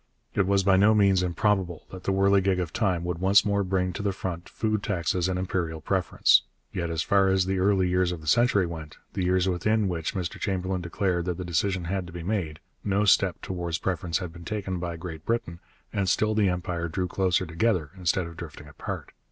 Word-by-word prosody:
It 100 Hz, -2 st, +1 dB
was 100 Hz, 0 st, +3 dB
by 95 Hz, -1 st, +4 dB
no 105 Hz, +3 st, +5 dB
means 100 Hz, -3 st, +4 dB
improbable 90 Hz, -1 st, 0 dB
that 95 Hz, -1 st, -9 dB
the -, -, +1 dB
whirligig 95 Hz, -1 st, +3 dB
of 85 Hz, -3 st, -3 dB
time 95 Hz, -6 st, 0 dB
would 85 Hz, -1 st, -3 dB
once 95 Hz, +2 st, +5 dB
more 100 Hz, -1 st, +1 dB
bring 90 Hz, -1 st, 0 dB
to -, -, -5 dB
the 100 Hz, -1 st, 0 dB
front 90 Hz, -2 st, -5 dB
food 110 Hz, -2 st, -1 dB
taxes 90 Hz, -2 st, 0 dB
and 90 Hz, -, -1 dB
imperial 90 Hz, -3 st, -2 dB
preference. 95 Hz, +2 st, +3 dB, 0.3 s
Yet 85 Hz, -1 st, -2 dB
as 80 Hz, -1 st, -1 dB
far 100 Hz, -1 st, +3 dB
as 95 Hz, -1 st, +3 dB
the 95 Hz, 0 st, -1 dB
early 95 Hz, -1 st, +3 dB
years 90 Hz, 0 st, +2 dB
of 90 Hz, -, -5 dB
the 80 Hz, -, -13 dB
century 110 Hz, 0 st, +3 dB
went, 80 Hz, -3 st, -7 dB, 0.2 s
the 95 Hz, -, -1 dB
years 90 Hz, +1 st, +2 dB
within 105 Hz, +4 st, +1 dB
which 85 Hz, -1 st, -3 dB
Mr 90 Hz, -3 st, -3 dB
Chamberlain 95 Hz, -1 st, -1 dB
declared 90 Hz, 0 st, -1 dB
that 90 Hz, -2 st, -2 dB
the 90 Hz, -, -5 dB
decision 90 Hz, +2 st, 0 dB
had 90 Hz, +1 st, -2 dB
to 85 Hz, -, -11 dB
be 85 Hz, -1 st, -6 dB
made, 85 Hz, -6 st, -2 dB, 0.2 s
no 100 Hz, +1 st, +1 dB
step 95 Hz, -2 st, +3 dB
towards 85 Hz, -3 st, -3 dB
preference 90 Hz, -2 st, -1 dB
had 90 Hz, -3 st, -6 dB
been 85 Hz, 0 st, -11 dB
taken 95 Hz, -1 st, -3 dB
by 85 Hz, -1 st, -4 dB
Great 80 Hz, -2 st, -7 dB
Britain, 100 Hz, -7 st, -2 dB, 0.3 s
and 100 Hz, -2 st, 0 dB
still 110 Hz, 0 st, +2 dB
the 105 Hz, -3 st, +3 dB
Empire 90 Hz, -2 st, -2 dB
drew 90 Hz, +2 st, -2 dB
closer 95 Hz, 0 st, +1 dB
together 85 Hz, -3 st, 0 dB
instead 90 Hz, 0 st, 0 dB
of 85 Hz, 0 st, -9 dB
drifting 80 Hz, -3 st, -9 dB
apart. 75 Hz, -, -6 dB
90 Hz, 215 wpm, -26 LUFS, 85-100 Hz, 0.3 s, no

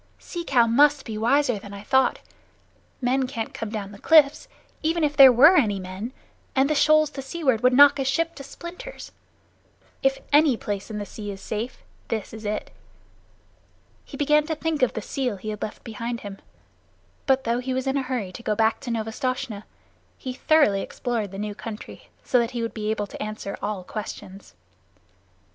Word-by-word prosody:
"Sea 345 Hz, -1 st, -6 dB
Cow 255 Hz, -7 st, +4 dB
must 285 Hz, +5 st, +4 dB
be 220 Hz, -, -5 dB
wiser 245 Hz, +1 st, +2 dB
than 200 Hz, 0 st, -10 dB
I 200 Hz, -, -9 dB
thought. 265 Hz, +4 st, +2 dB, 0.8 s
Men 260 Hz, +1 st, +1 dB
can't 230 Hz, -4 st, -5 dB
come 225 Hz, -, -5 dB
down 205 Hz, -2 st, -5 dB
the 200 Hz, -, -12 dB
cliffs, 300 Hz, 0 st, +4 dB, 0.3 s
even 330 Hz, +1 st, 0 dB
if 295 Hz, -1 st, +1 dB
there 270 Hz, -2 st, +10 dB
were 285 Hz, +9 st, +7 dB
any 210 Hz, -, +2 dB
men; 190 Hz, +6 st, -6 dB, 0.4 s
and 265 Hz, +1 st, +4 dB
the 305 Hz, -, +1 dB
shoals 310 Hz, 0 st, +4 dB
to 275 Hz, -, -6 dB
seaward 270 Hz, -4 st, 0 dB
would 250 Hz, -, +5 dB
knock 285 Hz, +2 st, +7 dB
a -, -, +1 dB
ship 330 Hz, +5 st, 0 dB
to 280 Hz, -, -10 dB
splinters. 350 Hz, -, -9 dB, 0.9 s
If 270 Hz, 0 st, +2 dB, 0.2 s
any 295 Hz, -4 st, +5 dB
place 205 Hz, -1 st, -4 dB
in 215 Hz, -, -5 dB
the 205 Hz, -, -4 dB
sea 205 Hz, 0 st, -8 dB
is 195 Hz, -1 st, -6 dB
safe, 220 Hz, +5 st, -5 dB, 0.2 s
this 220 Hz, -3 st, -4 dB
is 220 Hz, -1 st, -9 dB
it." 210 Hz, +1 st, -3 dB, 1.3 s
He -, -, -10 dB
began 300 Hz, +1 st, +3 dB
to 320 Hz, -, -1 dB
think 315 Hz, -1 st, -2 dB
of 255 Hz, -, +3 dB
the 220 Hz, -, -4 dB
seal 255 Hz, -5 st, -2 dB
he 215 Hz, +3 st, -6 dB
had 210 Hz, -1 st, -5 dB
left 215 Hz, -, -6 dB
behind 230 Hz, +1 st, -5 dB
him, 200 Hz, -1 st, -8 dB, 0.9 s
but 265 Hz, -1 st, +3 dB
though 235 Hz, 0 st, 0 dB
he 255 Hz, +1 st, -4 dB
was 260 Hz, +1 st, -1 dB
in 270 Hz, 0 st, 0 dB
a 275 Hz, -, +1 dB
hurry 250 Hz, -8 st, -3 dB
to 210 Hz, -, -9 dB
go 215 Hz, -2 st, -1 dB
back 220 Hz, 0 st, +2 dB
to -, -, -7 dB
Novastoshnah, 225 Hz, -1 st, -3 dB, 0.5 s
he 255 Hz, -, -5 dB
thoroughly 260 Hz, -9 st, +3 dB
explored 230 Hz, -3 st, -3 dB
the 195 Hz, -, -9 dB
new 210 Hz, +1 st, -3 dB
country, 215 Hz, +1 st, -9 dB, 0.2 s
so 250 Hz, -, +3 dB
that 235 Hz, -1 st, 0 dB
he 230 Hz, -, -1 dB
would 230 Hz, -, -3 dB
be 215 Hz, -1 st, -3 dB
able 215 Hz, -1 st, -1 dB
to -, -, -10 dB
answer 215 Hz, -2 st, -5 dB
all 205 Hz, -3 st, -3 dB
questions. 200 Hz, -1 st, -8 dB
240 Hz, 195 wpm, -24 LUFS, 215-275 Hz, 1.3 s, there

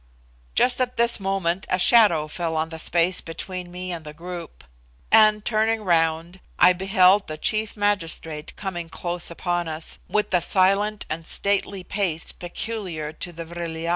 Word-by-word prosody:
Just 250 Hz, 0 st, +3 dB
at 250 Hz, -1 st, -1 dB
this 235 Hz, 0 st, +3 dB
moment 190 Hz, -2 st, -1 dB
a 185 Hz, -, +2 dB
shadow 185 Hz, -7 st, +5 dB
fell 165 Hz, +1 st, -3 dB
on 160 Hz, +1 st, -1 dB
the 160 Hz, -1 st, -5 dB
space 175 Hz, +3 st, +3 dB
between 180 Hz, +2 st, -7 dB
me 180 Hz, +1 st, -6 dB
and 170 Hz, -2 st, -5 dB
the 150 Hz, -1 st, -10 dB
group; 175 Hz, 0 st, -8 dB, 0.5 s
and, 215 Hz, -1 st, +5 dB
turning 220 Hz, 0 st, +1 dB
round, 165 Hz, 0 st, +1 dB, 0.2 s
I 180 Hz, +1 st, +6 dB
beheld 190 Hz, +1 st, +3 dB
the 155 Hz, -, -6 dB
chief 215 Hz, +3 st, -1 dB
magistrate 165 Hz, -6 st, -2 dB
coming 175 Hz, -4 st, -5 dB
close 175 Hz, +1 st, -2 dB
upon 175 Hz, 0 st, -2 dB
us, 160 Hz, 0 st, -5 dB
with 210 Hz, -, 0 dB
the 180 Hz, -, +4 dB
silent 195 Hz, +4 st, +2 dB
and 160 Hz, +1 st, -5 dB
stately 200 Hz, -1 st, -1 dB
pace 180 Hz, -5 st, -2 dB
peculiar 175 Hz, -4 st, -5 dB
to 175 Hz, -, -6 dB
the 165 Hz, 0 st, -8 dB
Vril 170 Hz, -1 st, -6 dB
ya. 165 Hz, +1 st, -3 dB
180 Hz, 165 wpm, -23 LUFS, 165-200 Hz, 0.5 s, I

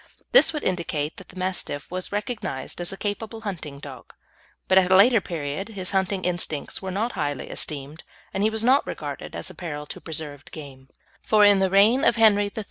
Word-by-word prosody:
This -, -, +7 dB
would 300 Hz, -2 st, -4 dB
indicate 165 Hz, -4 st, -2 dB
that 190 Hz, -, -12 dB
the -, -, -14 dB
Mastiff 185 Hz, -6 st, -3 dB
was 185 Hz, 0 st, -4 dB
recognised 205 Hz, -, -4 dB
as 175 Hz, -, 0 dB
a 195 Hz, -, -7 dB
capable 220 Hz, +2 st, -4 dB
hunting 165 Hz, -9 st, -6 dB
dog; 140 Hz, -2 st, -11 dB, 0.5 s
but 190 Hz, 0 st, +6 dB
at 185 Hz, 0 st, +1 dB
a -, -, +7 dB
later 220 Hz, +3 st, +6 dB
period 165 Hz, +3 st, -4 dB
his 190 Hz, -4 st, -2 dB
hunting 190 Hz, 0 st, 0 dB
instincts 175 Hz, -4 st, -2 dB
were 190 Hz, -, -4 dB
not 210 Hz, +6 st, -1 dB
highly 145 Hz, -5 st, -3 dB
esteemed, 145 Hz, +1 st, -5 dB, 0.3 s
and 195 Hz, -, -1 dB
he 215 Hz, -, +3 dB
was 220 Hz, 0 st, -1 dB
not 260 Hz, +4 st, +4 dB
regarded -, -, -6 dB
as -, -, -4 dB
a -, -, -12 dB
peril 150 Hz, -4 st, -6 dB
to -, -, -8 dB
preserved 150 Hz, -3 st, -7 dB
game; 135 Hz, -4 st, -11 dB, 0.3 s
for 210 Hz, -1 st, +4 dB
in 205 Hz, -1 st, +6 dB
the 190 Hz, -1 st, +2 dB
reign 210 Hz, +8 st, +5 dB
of -, -, +4 dB
Henry 215 Hz, -3 st, +5 dB
III. -, -, 0 dB
185 Hz, 205 wpm, -24 LUFS, 150-205 Hz, 0.5 s, This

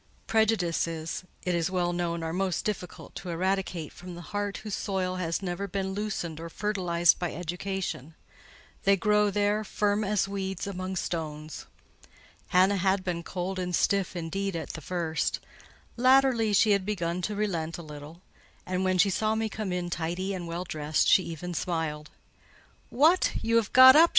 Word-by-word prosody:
Prejudices, 175 Hz, -7 st, 0 dB, 0.2 s
it 180 Hz, -, 0 dB
is 170 Hz, 0 st, +1 dB
well 175 Hz, -2 st, 0 dB
known, 170 Hz, -1 st, -2 dB
are 160 Hz, 0 st, -3 dB
most 185 Hz, -1 st, -1 dB
difficult 195 Hz, -4 st, -5 dB
to 180 Hz, -, -7 dB
eradicate 180 Hz, -2 st, -1 dB
from 180 Hz, 0 st, -9 dB
the 175 Hz, +3 st, -11 dB
heart 205 Hz, -1 st, -1 dB
whose 215 Hz, -2 st, -7 dB
soil 185 Hz, -2 st, -1 dB
has 170 Hz, +1 st, -2 dB
never 190 Hz, +2 st, -3 dB
been 190 Hz, 0 st, -2 dB
loosened 190 Hz, -6 st, -3 dB
or 165 Hz, 0 st, -6 dB
fertilised 175 Hz, -4 st, +2 dB
by 175 Hz, -2 st, -2 dB
education: 180 Hz, -3 st, -4 dB, 0.7 s
they 200 Hz, -1 st, +5 dB
grow 210 Hz, +2 st, +3 dB
there, 205 Hz, +1 st, +1 dB
firm 205 Hz, 0 st, 0 dB
as 205 Hz, -1 st, +1 dB
weeds 190 Hz, -1 st, -3 dB
among 190 Hz, -1 st, -4 dB
stones. 155 Hz, -3 st, -4 dB, 0.8 s
Hannah 190 Hz, +2 st, +4 dB
had 190 Hz, +1 st, +1 dB
been 175 Hz, -2 st, -2 dB
cold 185 Hz, +2 st, -4 dB
and 180 Hz, -1 st, -1 dB
stiff, 195 Hz, -2 st, +1 dB
indeed, 185 Hz, +3 st, -2 dB
at 165 Hz, -, -4 dB
the 160 Hz, -, -6 dB
first: 165 Hz, 0 st, -1 dB, 0.6 s
latterly 255 Hz, -3 st, +4 dB
she 210 Hz, +1 st, +4 dB
had 200 Hz, -1 st, +3 dB
begun 180 Hz, -3 st, -2 dB
to 210 Hz, +4 st, -2 dB
relent 170 Hz, -6 st, -2 dB
a 170 Hz, -, -8 dB
little; 150 Hz, +3 st, -10 dB, 0.4 s
and 185 Hz, 0 st, -1 dB
when 185 Hz, 0 st, +2 dB
she 195 Hz, +2 st, +4 dB
saw 215 Hz, +3 st, +1 dB
me 220 Hz, 0 st, -1 dB
come 210 Hz, -2 st, -4 dB
in 175 Hz, -1 st, -2 dB
tidy 175 Hz, +4 st, -2 dB
and 175 Hz, -3 st, -5 dB
well 170 Hz, +2 st, -3 dB
dressed, 155 Hz, -3 st, 0 dB
she -, -, +6 dB
even 170 Hz, +2 st, -5 dB
smiled. 160 Hz, -3 st, -2 dB, 0.8 s
"What, 315 Hz, +8 st, +4 dB
you 230 Hz, 0 st, +3 dB
have 225 Hz, -3 st, +1 dB
got 260 Hz, +1 st, +10 dB
up!" 330 Hz, +2 st, +8 dB
185 Hz, 170 wpm, -28 LUFS, 170-205 Hz, 0.8 s, got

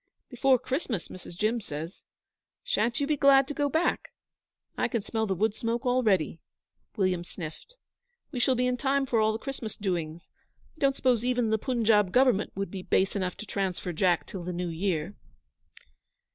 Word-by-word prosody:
'Before 260 Hz, +1 st, +4 dB
Christmas, 255 Hz, -, -3 dB
Mrs. 175 Hz, -2 st, -10 dB
Jim 225 Hz, +4 st, +1 dB
says. 160 Hz, 0 st, -7 dB, 0.6 s
Sha'n't 365 Hz, -, 0 dB
you 285 Hz, -, +1 dB
be 300 Hz, +1 st, +1 dB
glad 275 Hz, -1 st, +5 dB
to 290 Hz, -, -3 dB
go 290 Hz, 0 st, 0 dB
back? 320 Hz, +4 st, 0 dB, 0.6 s
I -, -, +1 dB
can 230 Hz, -6 st, -2 dB
smell 220 Hz, 0 st, -1 dB
the 190 Hz, -, 0 dB
wood 210 Hz, +3 st, +1 dB
smoke 230 Hz, +2 st, -2 dB
already'; 215 Hz, -, +2 dB, 0.6 s
William 185 Hz, -3 st, +1 dB
sniffed. 175 Hz, -, -9 dB, 0.6 s
'We 255 Hz, -, -3 dB
shall 255 Hz, +1 st, +3 dB
be 250 Hz, +1 st, +1 dB
in 250 Hz, 0 st, +1 dB
time 275 Hz, +1 st, +1 dB
for 240 Hz, -3 st, +1 dB
all 215 Hz, 0 st, +3 dB
the 220 Hz, -, -2 dB
Christmas 245 Hz, -2 st, -6 dB
doings. 170 Hz, -5 st, -3 dB, 0.4 s
I -, -, -22 dB
don't 275 Hz, -1 st, +3 dB
suppose 245 Hz, -4 st, +2 dB
even 245 Hz, -3 st, +1 dB
the 220 Hz, -, +2 dB
Punjab 220 Hz, -6 st, +2 dB
Government 250 Hz, -4 st, +3 dB
would 195 Hz, -2 st, -3 dB
be 195 Hz, -, -5 dB
base 190 Hz, +2 st, +1 dB
enough 185 Hz, -2 st, -2 dB
to -, -, -7 dB
transfer 190 Hz, -3 st, -2 dB
Jack 175 Hz, +1 st, +2 dB
till 190 Hz, -, -7 dB
the 180 Hz, -, -4 dB
new 175 Hz, 0 st, -2 dB
year?' 170 Hz, +1 st, -2 dB
220 Hz, 180 wpm, -28 LUFS, 185-255 Hz, 0.6 s, glad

